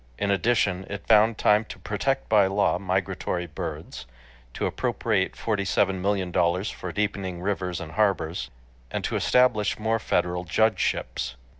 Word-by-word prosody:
In 100 0 0
addition, 100 -2 +1
it 100 0 -6
found 110 0 +5
time 105 +1 +4
to - - -9
protect 120 +7 -2
by 105 -3 +5
law 100 -2 +1
migratory 95 -1 -2
birds, 60 -5 -7 0.5
to - - -1
appropriate - - 0
forty 105 -3 -1
seven 95 -1 +1
million 95 -2 0
dollars 90 +4 +1
for - - -6
deepening 100 -4 -2
rivers 90 -2 -2
and 80 -1 -7
harbors, 95 -5 0 0.4
and - - -3
to - - -2
establish 125 -5 +3
more 110 +1 0
federal 90 -3 0
judgeships. 90 - 0
100 Hz, 145 wpm, -25 LUFS, 90-105 Hz, 0.5 s, found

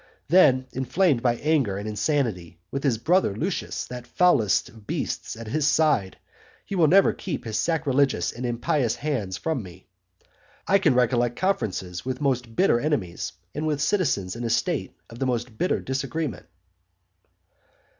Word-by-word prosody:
Then, 140 -7 +5
inflamed 135 +1 +1
by 120 -1 +2
anger 135 -8 +1
and 100 +2 -5
insanity, 105 - -1
with 135 - -3
his 130 -6 +2
brother 165 - +2
Lucius, 170 - -3
that 125 -1 -8
foulest 140 - +3
of 110 -2 -17
beasts, - - -3
at 115 0 -8
his 145 +6 0
side, 150 -11 +2 0.5
he - - -7
will 170 -4 +4
never 195 +5 +5
keep 150 -9 -5
his 110 -1 -2
sacrilegious 140 - +1
and 120 - -8
impious 120 +1 0
hands 115 -12 -3
from 160 -6 -2
me. 90 -2 -12 0.8
I 195 - +4
can 185 -9 +3
recollect 120 -1 +2
conferences 95 - -2
with 130 0 -3
most 125 -5 -1
bitter 185 -8 +3
enemies, 115 - -2 0.2
and 155 +2 -2
with 150 -2 0
citizens 145 - 0
in 120 - -5
a 115 - -1
state 115 - -1
of 115 - -12
the 135 - 0
most 120 -2 -2
bitter 180 +11 0
disagreement. 135 - -3
130 Hz, 155 wpm, -25 LUFS, 110-155 Hz, 0.8 s, Then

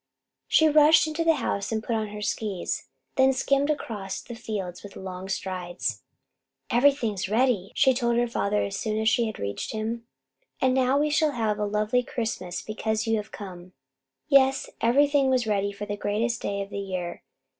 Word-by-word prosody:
She 315 - +5
rushed 305 +1 +6
into 315 +1 -2
the 330 -1 +4
house 215 -7 -2
and 220 0 -1
put 230 - -1
on 220 -1 -1
her 210 0 -7
skis, 205 -4 -2 0.3
then 265 0 +5
skimmed 275 +2 +1
across 210 -10 -3
the 240 - -9
fields 210 -6 -5
with 205 - -11
long 190 0 -7
strides. 185 -2 -3 0.7
"Everything 250 -3 +3
is 190 -1 -3
ready," 220 -4 +1
she 265 -2 +5
told 235 -2 +1
her 240 0 +2
father 210 -3 0
as 200 0 -3
soon 215 -1 -1
as 220 - 0
she 230 -1 +3
reached 100 0 -4
him. 230 +2 -3 0.5
"And 260 -1 +3
now 260 +1 +3
we 300 +1 +1
shall 305 0 +2
have 215 -4 -1
a 210 - +1
lovely 210 +4 +1
Christmas 225 -7 -4
because 220 0 -2
you 225 -1 +2
have 210 0 -6
come." 185 -2 -9 0.5
Yes, 270 -1 +4
everything 280 +3 +4
was 255 -2 +2
ready 200 -2 0
for 205 +1 -6
the 205 0 -4
greatest 225 +3 -1
day 200 0 -2
of 195 - -12
the - - -4
year. 185 -3 -4
220 Hz, 185 wpm, -26 LUFS, 200-260 Hz, 0.7 s, rushed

